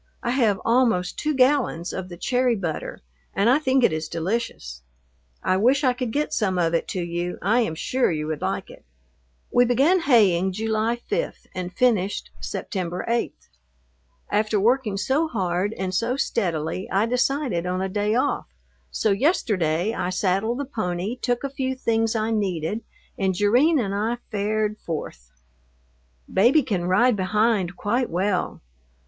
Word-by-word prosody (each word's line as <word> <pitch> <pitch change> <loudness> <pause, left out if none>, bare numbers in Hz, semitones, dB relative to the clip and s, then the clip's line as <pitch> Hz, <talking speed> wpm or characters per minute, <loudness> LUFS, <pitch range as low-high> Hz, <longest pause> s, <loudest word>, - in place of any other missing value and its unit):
I 240 - 0
have 230 -6 +2
almost 230 -7 +2
two 305 -1 0
gallons 255 - +2
of 185 -1 -5
the 175 - -9
cherry 250 +4 +1
butter, 175 -6 -4 0.3
and 205 +5 +3
I 275 - +4
think 265 -3 +2
it 200 - +4
is 155 0 -3
delicious. 165 - -3 0.6
I 185 - +2
wish 260 +8 +3
I 255 -2 +4
could 250 -1 -3
get 295 +5 -1
some 190 -4 0
of 165 -1 +1
it 165 - 0
to 180 - -3
you, 175 +1 -3
I 220 +6 +2
am 195 -10 0
sure 255 +10 0
you 155 -2 -2
would 155 -1 -4
like - - -3
it. - - -15 0.7
We 245 - +6
began 275 +10 +3
haying 195 - +3
July 220 +2 0
5 480 +4 -3
and 180 -1 -4
finished 205 -2 0
September 180 -3 -4
8. 235 0 0 1.0
After 215 0 +1
working 225 -1 +1
so 270 +10 +1
hard 190 - -1
and 185 -1 -3
so 235 +7 0
steadily 175 - -2
I 195 +3 +2
decided 250 - 0
on 180 0 -1
a - - 0
day 205 +3 0
off, 250 - 0 0.4
so 215 - 0
yesterday 200 - +1
I 180 - -2
saddled 195 +5 0
the 285 - -3
pony, 205 -4 -3
took 245 0 -2
a - - 0
few 260 -1 -2
things 225 -2 0
I 220 0 0
needed, 200 -1 -1 0.4
and 190 -2 +1
Jerrine 245 - +4
and 200 -7 -1
I 220 +4 -1
fared 210 0 -1
forth. 65 - -6 1.0
Baby 245 +10 +4
can 195 -8 -2
ride 220 +7 +3
behind 200 -1 +1
quite 240 +4 0
well. 185 +2 -1
210 Hz, 160 wpm, -24 LUFS, 180-245 Hz, 1.0 s, We